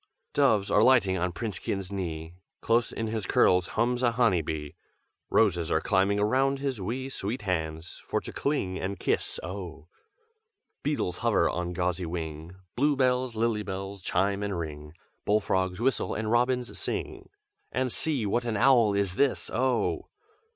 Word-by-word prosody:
"Doves 110 Hz, -8 st, +3 dB
are 105 Hz, -, +5 dB
lighting 110 Hz, -6 st, +5 dB
on 90 Hz, +1 st, 0 dB
Princekin's 95 Hz, -1 st, -4 dB
knee, 80 Hz, -4 st, -4 dB, 0.3 s
Close 115 Hz, +1 st, +1 dB
in 115 Hz, -, -3 dB
his 110 Hz, -3 st, -3 dB
curls 90 Hz, 0 st, +4 dB
hums 125 Hz, +1 st, +2 dB
a 120 Hz, -2 st, +2 dB
honey 115 Hz, -8 st, +3 dB
bee, 75 Hz, -1 st, -5 dB, 0.6 s
Roses 90 Hz, -7 st, +2 dB
are 80 Hz, -, +2 dB
climbing 95 Hz, +3 st, +2 dB
around 135 Hz, +6 st, +2 dB
his 135 Hz, -5 st, -3 dB
wee 125 Hz, +7 st, -3 dB
Sweet 110 Hz, -3 st, -4 dB
hands, 80 Hz, -3 st, -3 dB
for -, -, 0 dB
to -, -, -8 dB
cling 100 Hz, -11 st, -1 dB
and 100 Hz, +1 st, -3 dB
kiss, -, -, -1 dB
oh! 90 Hz, -4 st, -7 dB, 0.9 s
Beetles 140 Hz, -11 st, -1 dB
hover -, -, +2 dB
on 90 Hz, 0 st, -2 dB
gauzy 90 Hz, 0 st, -1 dB
wing, 80 Hz, 0 st, -5 dB, 0.2 s
Blue 145 Hz, +3 st, +3 dB
bells, 130 Hz, -2 st, +1 dB
lily 110 Hz, -1 st, +1 dB
bells, 95 Hz, 0 st, -5 dB
chime 100 Hz, +3 st, 0 dB
and 100 Hz, -3 st, -2 dB
ring, 75 Hz, -2 st, -6 dB, 0.3 s
Bull 105 Hz, +1 st, +3 dB
frogs 95 Hz, -2 st, -1 dB
whistle 130 Hz, +2 st, 0 dB
and 110 Hz, 0 st, -2 dB
robins 125 Hz, +1 st, +1 dB
sing, -, -, -4 dB, 0.4 s
And 130 Hz, -1 st, 0 dB
see, 140 Hz, -6 st, 0 dB
what 120 Hz, +4 st, +1 dB
an 115 Hz, -3 st, -1 dB
owl 115 Hz, -4 st, +5 dB
is 100 Hz, -2 st, 0 dB
this, 140 Hz, -2 st, +1 dB
oh! 125 Hz, -1 st, 0 dB
100 Hz, 160 wpm, -28 LUFS, 90-120 Hz, 0.9 s, are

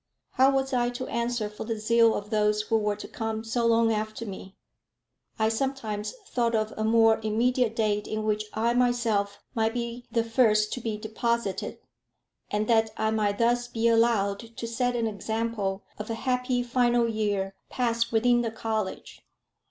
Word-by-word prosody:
How 265 Hz, +1 st, +5 dB
was 270 Hz, 0 st, 0 dB
I 240 Hz, -1 st, +2 dB
to 245 Hz, +1 st, -5 dB
answer 235 Hz, -2 st, -1 dB
for 210 Hz, 0 st, -7 dB
the 225 Hz, 0 st, -3 dB
zeal 230 Hz, +1 st, +4 dB
of 205 Hz, +2 st, -5 dB
those 210 Hz, 0 st, +2 dB
who 225 Hz, +1 st, +1 dB
were 210 Hz, -1 st, 0 dB
to 210 Hz, -, -8 dB
come 220 Hz, -1 st, -4 dB
so 230 Hz, +1 st, 0 dB
long 230 Hz, 0 st, +4 dB
after 215 Hz, +1 st, -3 dB
me? 190 Hz, -1 st, -8 dB, 0.8 s
I 220 Hz, -, +2 dB
sometimes 225 Hz, -, -2 dB
thought 235 Hz, -6 st, 0 dB
of 215 Hz, 0 st, 0 dB
a 215 Hz, -, -2 dB
more 225 Hz, 0 st, +4 dB
immediate 230 Hz, +2 st, +1 dB
date 210 Hz, -2 st, 0 dB
in 215 Hz, 0 st, -3 dB
which 215 Hz, 0 st, 0 dB
I 230 Hz, +2 st, +1 dB
myself 235 Hz, -5 st, +1 dB
might 225 Hz, -1 st, 0 dB
be 240 Hz, 0 st, -4 dB
the 230 Hz, -, +2 dB
first 220 Hz, -3 st, +3 dB
to 250 Hz, -, -4 dB
be 220 Hz, -2 st, -3 dB
deposited, 220 Hz, -2 st, -2 dB, 0.7 s
and 210 Hz, +1 st, -1 dB
that 225 Hz, -1 st, +3 dB
I 220 Hz, 0 st, +1 dB
might 210 Hz, -2 st, 0 dB
thus 240 Hz, +1 st, +2 dB
be 230 Hz, -1 st, 0 dB
allowed 225 Hz, -4 st, +3 dB, 0.2 s
to 230 Hz, -, -4 dB
set 245 Hz, +1 st, 0 dB
an 230 Hz, -1 st, 0 dB
example 215 Hz, -1 st, -2 dB, 0.2 s
of 210 Hz, -, -6 dB
a 225 Hz, -, -1 dB
happy 250 Hz, 0 st, 0 dB
final 240 Hz, -1 st, +2 dB
year 205 Hz, -3 st, -1 dB, 0.2 s
passed 235 Hz, -2 st, 0 dB
within 240 Hz, +2 st, +3 dB
the 230 Hz, -, -1 dB
college. 220 Hz, -3 st, -4 dB
225 Hz, 175 wpm, -27 LUFS, 215-240 Hz, 0.8 s, How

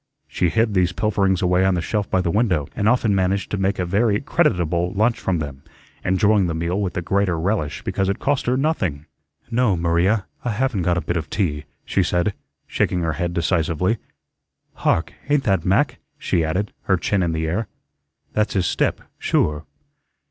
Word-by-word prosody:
She 90 Hz, -, 0 dB
hid 110 Hz, +4 st, +1 dB
these 90 Hz, -1 st, +2 dB
pilferings 95 Hz, -2 st, +1 dB
away 90 Hz, +1 st, +3 dB
on 95 Hz, -1 st, +3 dB
the -, -, 0 dB
shelf 105 Hz, +1 st, -1 dB
by 95 Hz, -, +2 dB
the 85 Hz, -, 0 dB
window, 95 Hz, -, +1 dB
and 105 Hz, +1 st, +2 dB
often 115 Hz, -4 st, +2 dB
managed 95 Hz, 0 st, 0 dB
to 100 Hz, -, -1 dB
make 95 Hz, +1 st, 0 dB
a 90 Hz, -, -1 dB
very 105 Hz, +3 st, +2 dB
creditable 90 Hz, -, +1 dB
lunch 110 Hz, +4 st, +2 dB
from 95 Hz, -2 st, 0 dB
them, 70 Hz, -3 st, -5 dB, 0.4 s
enjoying 100 Hz, +1 st, +3 dB
the 85 Hz, -, -2 dB
meal 85 Hz, +5 st, -1 dB
with 95 Hz, -3 st, -2 dB
the 90 Hz, -, -3 dB
greater 95 Hz, -2 st, +1 dB
relish 80 Hz, -6 st, -1 dB
because 95 Hz, 0 st, -1 dB
it 100 Hz, -, 0 dB
cost 140 Hz, -2 st, 0 dB
her 125 Hz, +1 st, +2 dB
nothing. 90 Hz, -, -1 dB, 0.5 s
"No, 115 Hz, -5 st, +2 dB
Maria, 85 Hz, +5 st, +2 dB, 0.2 s
I 120 Hz, -, -1 dB
haven't 120 Hz, -3 st, 0 dB
got 85 Hz, 0 st, +1 dB
a -, -, 0 dB
bit 85 Hz, +3 st, -2 dB
of 80 Hz, -1 st, -4 dB
tea," 75 Hz, -8 st, -1 dB, 0.2 s
she 95 Hz, -, +1 dB
said, 90 Hz, +2 st, +1 dB, 0.3 s
shaking 90 Hz, -, 0 dB
her 80 Hz, -2 st, 0 dB
head 85 Hz, 0 st, -2 dB
decisively. 85 Hz, +4 st, +1 dB, 0.7 s
"Hark, 80 Hz, -, 0 dB, 0.2 s
ain't 145 Hz, -1 st, +3 dB
that 95 Hz, -5 st, +1 dB
Mac?" 120 Hz, +7 st, +2 dB, 0.2 s
she 90 Hz, -, 0 dB
added, 90 Hz, +6 st, -1 dB
her 95 Hz, -, +3 dB
chin 95 Hz, +3 st, 0 dB
in 85 Hz, -2 st, +1 dB
the 80 Hz, 0 st, -1 dB
air. 100 Hz, +7 st, -1 dB, 0.7 s
"That's 105 Hz, 0 st, +1 dB
his 95 Hz, -2 st, +2 dB
step, -, -, 0 dB, 0.2 s
sure." 75 Hz, +1 st, 0 dB
95 Hz, 190 wpm, -22 LUFS, 85-105 Hz, 0.7 s, away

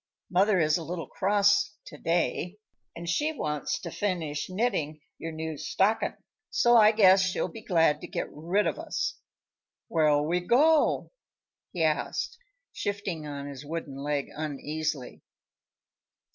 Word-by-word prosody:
Mother 190 Hz, +2 st, +4 dB
is 155 Hz, +1 st, +3 dB
a -, -, -6 dB
little 165 Hz, +1 st, -4 dB
cross, 205 Hz, +1 st, +2 dB
to -, -, -10 dB
day, 175 Hz, +2 st, 0 dB, 0.4 s
and 170 Hz, 0 st, -7 dB
she 295 Hz, -, +1 dB
wants 150 Hz, -, -2 dB
to 170 Hz, -, -6 dB
finish 165 Hz, -8 st, -2 dB
knitting 185 Hz, -7 st, -1 dB, 0.2 s
your 165 Hz, -, -5 dB
new 160 Hz, -1 st, -5 dB
stockin'; 195 Hz, +7 st, +1 dB, 0.3 s
so 240 Hz, -9 st, +4 dB
I 215 Hz, -2 st, +8 dB
guess 195 Hz, -3 st, +6 dB
she'll 185 Hz, 0 st, 0 dB
be 225 Hz, -, -10 dB
glad 165 Hz, -7 st, +2 dB
to -, -, -7 dB
get -, -, -3 dB
rid 175 Hz, +7 st, 0 dB
of -, -, -1 dB
us." -, -, -3 dB, 0.7 s
"Where'll 150 Hz, -2 st, +3 dB
we 175 Hz, +2 st, +1 dB
go?" 290 Hz, -, +3 dB, 0.6 s
he 170 Hz, -, -1 dB
asked, 160 Hz, -, -1 dB, 0.3 s
shifting 195 Hz, -6 st, -3 dB
on 140 Hz, -1 st, -6 dB
his 140 Hz, -1 st, -8 dB
wooden 150 Hz, -2 st, -5 dB
leg 145 Hz, 0 st, -2 dB
uneasily. 150 Hz, -2 st, -4 dB
170 Hz, 140 wpm, -28 LUFS, 150-205 Hz, 0.7 s, I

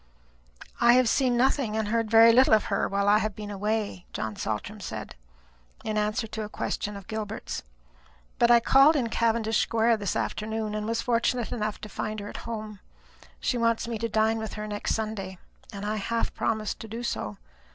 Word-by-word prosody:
"I 235 Hz, 0 st, +6 dB
have 255 Hz, -1 st, +4 dB
seen 250 Hz, 0 st, +2 dB
nothing 250 Hz, -3 st, +1 dB
and 220 Hz, -1 st, -1 dB
heard 225 Hz, 0 st, 0 dB
very 230 Hz, +1 st, +8 dB
little 255 Hz, -2 st, +6 dB
of 215 Hz, -, +1 dB
her -, -, +1 dB
while 200 Hz, 0 st, 0 dB
I 210 Hz, +1 st, +6 dB
have 215 Hz, -3 st, -2 dB
been 210 Hz, -1 st, -7 dB
away," 205 Hz, -2 st, -2 dB
John 110 Hz, -1 st, -3 dB
Saltram 110 Hz, -, -4 dB
said, 110 Hz, -, -6 dB, 0.7 s
in 215 Hz, -, -2 dB
answer 210 Hz, +2 st, 0 dB
to 220 Hz, 0 st, -6 dB
a 210 Hz, -, -5 dB
question 210 Hz, -1 st, -3 dB
of 200 Hz, -, -11 dB
Gilbert's; 220 Hz, 0 st, -5 dB, 0.8 s
"but 235 Hz, -, +5 dB
I 235 Hz, -1 st, +7 dB
called 275 Hz, +6 st, +6 dB
in 245 Hz, -5 st, 0 dB
Cavendish 225 Hz, -1 st, +1 dB
square 230 Hz, 0 st, +2 dB
this 205 Hz, -4 st, -2 dB
afternoon, 215 Hz, 0 st, -2 dB
and 210 Hz, 0 st, -3 dB
was 230 Hz, 0 st, -1 dB
fortunate 240 Hz, 0 st, 0 dB
enough 215 Hz, -2 st, -2 dB
to -, -, -6 dB
find 215 Hz, +1 st, -4 dB
her 205 Hz, 0 st, -6 dB
at -, -, -7 dB
home. 215 Hz, -3 st, -6 dB, 0.6 s
She 245 Hz, -, -1 dB
wants 230 Hz, 0 st, +1 dB
me 230 Hz, -2 st, -3 dB
to 230 Hz, +1 st, -2 dB
dine 220 Hz, +1 st, +2 dB
with 220 Hz, 0 st, -5 dB
her 210 Hz, 0 st, -5 dB
next 205 Hz, -1 st, -2 dB
Sunday, 210 Hz, -4 st, -4 dB, 0.3 s
and 200 Hz, -1 st, -6 dB
I 215 Hz, +1 st, -1 dB
half 230 Hz, +3 st, -2 dB
promised 215 Hz, -2 st, -2 dB
to 225 Hz, -, -8 dB
do 230 Hz, +3 st, -6 dB
so. 105 Hz, -, -3 dB
220 Hz, 195 wpm, -27 LUFS, 210-230 Hz, 0.8 s, very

